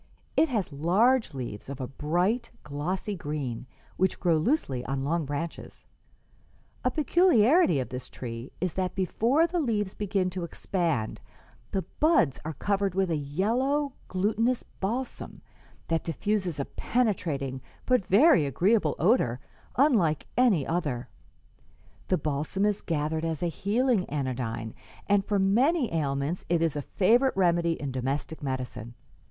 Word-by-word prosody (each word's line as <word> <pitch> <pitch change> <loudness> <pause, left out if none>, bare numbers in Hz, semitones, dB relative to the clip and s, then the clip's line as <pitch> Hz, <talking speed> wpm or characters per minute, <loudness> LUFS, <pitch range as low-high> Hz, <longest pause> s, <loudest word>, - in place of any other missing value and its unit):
It 320 - +4
has 210 - -1
large 190 - +2
leaves 120 -3 -6
of 140 0 -6
a 130 - -2
bright, 175 - 0
glossy 180 +8 -3
green, 145 -7 -4 0.3
which 190 0 +1
grow 175 -2 +3
loosely 155 - 0
on 135 0 -2
long 160 +2 0
branches, 145 +4 -6 1.0
A - - +3
peculiarity 305 - +4
of 130 - -3
this 125 0 -6
tree 115 0 -7
is 185 -2 -1
that 185 -1 -2
before 230 - +2
the 345 +1 -1
leaves 210 - 0
begin 195 -3 -1
to 180 -1 -4
expand 170 - -2 0.5
the 190 - -1 0.2
buds 295 - +3
are 160 +1 -4
covered 200 +2 0
with 190 -2 +1
a - - +2
yellow, 235 - 0
glutinous 220 +6 0
balsam 240 +7 -5 0.4
that 165 -1 0
diffuses 185 -1 -1
a 140 - -1
penetrating 155 - -1 0.2
but 250 -5 +3
very 205 - +5
agreeable 175 - +2
odor 155 - +2 0.4
unlike 210 - +3
any 220 - +3
other. 140 -8 -2 1.0
The 185 - +2
balsam 155 +6 -1
is 210 -1 0
gathered 155 0 -1
as 165 -1 -2
a 175 - +1
healing 210 - +1
anodyne, 125 -5 -3 0.3
and 205 -1 +3
for 205 +1 0
many 240 - +2
ailments 145 +1 -1
it 170 -1 +2
is 160 -3 0
a 145 - -1
favorite 235 - +2
remedy 170 -2 +3
in 145 -4 -4
domestic 135 +5 -3
medicine. 130 -3 -4
175 Hz, 140 wpm, -28 LUFS, 145-215 Hz, 1.0 s, very